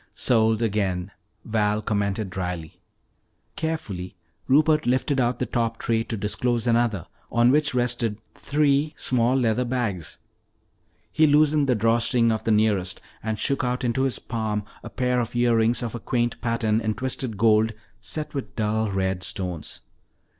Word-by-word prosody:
"Sold 110 -1 +2
again," 100 -4 -1 0.3
Val 105 -1 +1
commented 100 -2 -1
dryly. 90 -4 -5 0.7
Carefully 100 - -4 0.3
Rupert 150 +1 +3
lifted 130 +2 +1
out 120 0 +1
the - - -1
top 115 -1 -1
tray 115 -1 0
to 115 - -4
disclose 115 +4 0
another 115 -6 +1 0.3
on 120 +1 +4
which 145 -1 +2
rested 120 -3 0 0.2
three 145 +1 +1
small 125 0 +1
leather 125 -1 +2
bags. 115 -9 -3 0.9
He 155 0 +4
loosened 150 -1 +4
the 125 - +4
draw 115 +2 +2
string 115 0 +2
of 110 - -2
the 115 - +2
nearest 105 -4 +1 0.2
and 110 0 -2
shook 135 +6 0
out 125 +1 -1
into 120 +1 0
his 130 -5 +1
palm 110 -2 -3 0.2
a - - -8
pair 125 -1 0
of 120 0 -3
earrings 120 0 +2
of 115 - -4
a 120 - -4
quaint 120 +1 -1
pattern 115 -2 0
in 110 -1 -1
twisted 130 -3 -3
gold 110 +1 +3 0.3
set 150 +7 -4
with 140 -3 -5
dull 110 0 0
red 95 -1 -1
stones. 90 -4 -3
115 Hz, 155 wpm, -24 LUFS, 105-125 Hz, 0.9 s, on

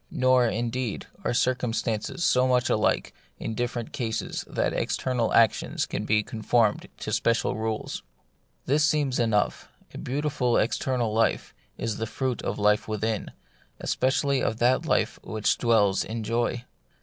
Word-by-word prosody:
Nor, 130 -1 +3
indeed, 120 0 -2 0.2
are - - 0
circumstances 120 +3 -1
so 130 -4 +4
much 125 0 +2
alike 110 - +1 0.2
in 115 - -4
different 120 +1 -3
cases 120 -6 -3
that - - -1
external 125 -3 -1
actions 115 -2 +3
can - - -4
be 105 0 +2
conformed 110 0 +1
to - - -3
special 115 0 +1
rules. 110 0 -3 0.6
This 150 +3 +2
seems 145 -3 +1
enough: 110 -3 +1 0.3
a - - -7
beautiful 135 -2 0
external 120 0 0
life 115 +1 +1 0.2
is 115 -2 -2
the 115 - -3
fruit 125 +2 -2
of - - -3
life 105 0 +2
within, 110 0 -2 0.5
especially 135 +1 +1
of 110 - -1
that 125 +2 +2
life - - +1
which 110 -1 0
dwells 105 -5 +3
in 115 0 -5
joy. 120 +2 -1
120 Hz, 140 wpm, -26 LUFS, 110-130 Hz, 0.6 s, so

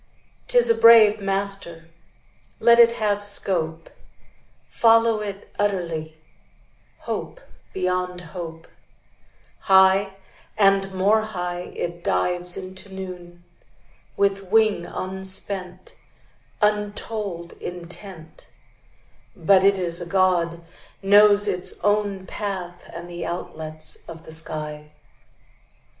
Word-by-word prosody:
'Tis - - +5
a 460 - +5
brave 220 - +6
master; 195 -4 -2 0.7
Let 235 +1 +5
it 235 0 +7
have 205 -2 -1
scope: 165 -5 -1 0.7
Follow 230 -1 +3
it 200 -1 -7
utterly, 170 -6 -2 0.8
Hope - - -5 0.3
beyond 180 -1 -2
hope: 165 -2 -8 0.9
High 190 0 +4 0.4
and 195 -1 +3
more 200 +4 +2
high 180 -4 -5
It 170 0 -5
dives 180 0 0
into 190 +1 -9
noon, 180 -2 -9 0.7
With 195 -1 +1
wing 210 -3 +2
unspent, 190 -1 -3 0.7
Untold 210 -4 -2
intent; 175 -1 -9 0.9
But 185 +3 +3
it 200 0 +4
is 170 -2 -1
a 175 - -6
God, 175 -3 +1 0.4
Knows 205 +1 +6
its 180 -3 -1
own 205 -2 0
path 185 -3 -6
And 175 - -8
the 175 -1 -7
outlets 155 -3 -6
of 165 -1 -10
the - - -11
sky. 150 -1 -5
190 Hz, 95 wpm, -23 LUFS, 175-205 Hz, 0.9 s, it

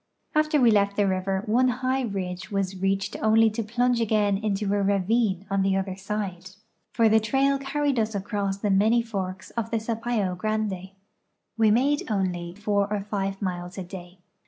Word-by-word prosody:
After 305 -1 +2
we 240 -3 +5
left 200 -1 +2
the 205 - +2
river 190 +1 -1
one 245 +4 +3
high 255 +2 0
ridge 190 -5 -4
was 195 -2 -2
reached 195 0 0
onl}" 220 0 +4
to 230 - -2
plunge 240 +2 +1
again 210 -2 +2
into 210 -1 -1
a 205 - +1
ravine 200 0 +1
on 195 0 0
the 195 0 +2
other 190 -1 -2
side, 195 -2 -4 0.4
for 230 - +3
the 220 0 +5
trail 270 +5 +1
carried 275 -1 0
us 220 -1 -1
across 200 0 -2
the 205 0 -1
many 220 +5 +3
forks 190 -4 -5
of 230 -1 -3
the 230 - 0
Sapa}^ 220 -4 -1
Grande. 210 -3 -2 0.7
We 225 -1 +4
made 270 +7 +2
only 180 -4 -2
four 205 0 0
or 210 -1 0
five 195 -1 -3
miles 180 0 -4
a 190 - -3
day. 180 0 -10
205 Hz, 180 wpm, -25 LUFS, 195-225 Hz, 0.7 s, we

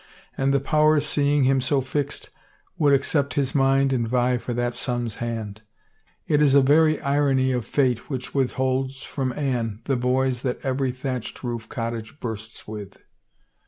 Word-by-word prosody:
And 135 0 +1
the 140 - +3
powers, 150 +1 +3
seeing 145 -1 +2
him 135 0 +3
so 135 +2 +1
fixed, 140 +2 -3 0.4
would 145 -3 +3
accept 140 +1 +1
his 135 -3 0
mind 135 0 +3
and 120 -3 0
vie 125 +1 +1
for 120 - -5
that 120 0 -1
son's 120 -2 -3
hand. 110 -3 -4 0.6
It 150 -1 +2
is 140 -2 +5
a 140 - +7
very 155 +2 +4
irony 140 -2 +2
of 125 -3 -2
fate 125 -5 0
which 130 -3 -5
withholds 130 0 -1
from 130 -2 -3
Anne 120 -6 -2
the 135 - +1
boys 125 0 +1
that 125 -2 -2
every 130 0 0
thatched 130 -1 -5
roof 120 -2 -4
cottage 115 +2 -5
bursts 110 -1 -7
with." 105 -2 -8
130 Hz, 160 wpm, -24 LUFS, 120-140 Hz, 0.6 s, a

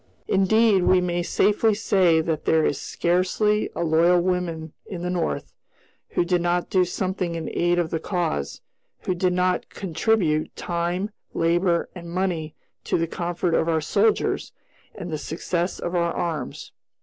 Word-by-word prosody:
Indeed, 200 +1 +4
we 185 - +5
may 175 -1 -1
safely 210 +4 +2
say 185 -6 +3
that 160 -1 -2
there 160 -1 +3
is 145 - -1
scarcely 185 +5 +1
a - - -1
loyal 170 +2 +4
woman 170 -3 -2
in 175 -3 -6
the 180 - -1
North 175 -2 -2 0.6
who 175 - 0
did 175 0 +1
not 175 0 0
do 185 -1 +4
something 185 -1 -2
in 165 -1 -4
aid 175 0 +2
of 170 -2 0
the 165 - -1
cause; 165 - -2 0.4
who 185 - -1
did 180 0 +1
not 180 0 0
contribute 170 -3 0
time, 175 +4 -2 0.2
labor, 170 +1 +2
and 170 -2 -9
money 170 -4 -2 0.3
to - - +1
the 165 - +1
comfort 175 +1 -2
of 165 0 +2
our 160 -1 +2
soldiers 425 - +1 0.4
and 180 -4 -6
the 155 - -2
success 170 +4 -2
of 175 - -4
our 170 -1 +1
arms. 165 -3 -4
175 Hz, 160 wpm, -24 LUFS, 165-185 Hz, 0.6 s, we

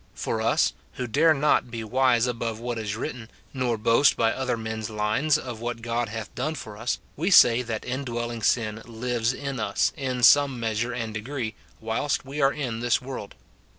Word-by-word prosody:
For - - -2
us, - - +2 0.2
who 125 - -4
dare 150 +8 +4
not 140 -3 +2
be 115 -1 -5
wise 125 +1 +3
above 115 -2 -3
what 120 -1 -3
is 105 -1 -3
written, 120 -2 -5 0.2
nor 125 -3 0
boast 115 +6 +4
by 115 -1 +2
other 130 -2 -1
men's 110 -1 -4
lines 110 +8 +1
of 120 -4 -6
what 120 -1 -4
God 120 -1 -1
hath 110 -1 -6
done 155 +6 -2
for 110 -7 -8
us, 115 +4 -2 0.2
we 170 +6 0
say 120 -10 +7
that 115 -3 -4
indwelling 120 -3 -3
sin 110 -1 +1
lives 115 0 -1
in 140 -1 -5
us, 100 -2 +1
in 130 -4 -3
some 140 0 +6
measure 115 +1 -1
and 115 -3 -4
degree, 110 +1 -4 0.3
whilst 115 +6 -1
we 140 +3 -4
are 135 0 +5
in 125 -6 -3
this 120 -1 +2
world. 130 -6 -7
120 Hz, 185 wpm, -25 LUFS, 110-130 Hz, 0.3 s, say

